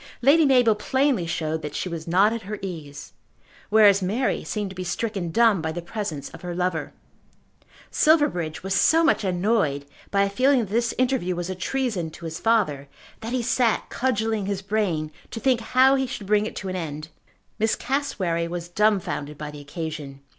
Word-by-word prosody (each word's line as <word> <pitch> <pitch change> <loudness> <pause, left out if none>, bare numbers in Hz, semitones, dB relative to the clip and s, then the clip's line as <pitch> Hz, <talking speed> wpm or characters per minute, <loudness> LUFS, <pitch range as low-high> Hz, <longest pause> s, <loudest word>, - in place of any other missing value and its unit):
Lady 300 +5 +6
Mabel 250 -4 +5
plainly 255 -2 0
showed 160 -1 -2
that 150 -1 -6
she - - -2
was 165 -2 -6
not 195 +6 +4
at 230 - -4
her 210 +1 -6
ease; 150 -6 -7 0.6
whereas 205 -2 +6
Mary 215 +8 0
seemed 205 -3 -3
to - - -11
be 185 - -4
stricken 195 -1 -3
dumb 225 -1 +3
by 160 0 -2
the 170 - -4
presence 170 -5 -5
of - - -12
her 175 -1 -5
lover. 180 -2 -1 1.0
Silverbridge 290 - +2
was 190 0 -2
so 325 +11 +4
much 330 - +3
annoyed 180 -6 0 0.2
by 200 0 +2
a 200 - 0
feeling 265 +6 +3
that 210 - -5
this 235 +1 0
interview 250 -8 +1
was 175 +1 -3
a - - -1
treason 200 -3 -2
to 165 +2 -11
his 165 +1 -5
father, 155 -12 +1 0.3
that 225 +1 -6
he 250 -1 -1
sat 235 -1 +1
cudgelling 220 -5 -1
his 200 -1 -3
brain 190 -7 -1 0.2
to 225 - -6
think 255 -1 +2
how 260 +3 +4
he 265 -1 +1
should 210 - -6
bring 210 +1 +2
it - - -8
to 195 - -5
an 185 - -3
end. 155 -3 -5 0.5
Miss 220 +1 +2
Cassewary 190 -12 -1
was 175 0 -5
dumbfounded 175 -7 0
by 150 0 -6
the 145 0 -10
occasion. 145 -2 -6
195 Hz, 190 wpm, -24 LUFS, 165-230 Hz, 1.0 s, Lady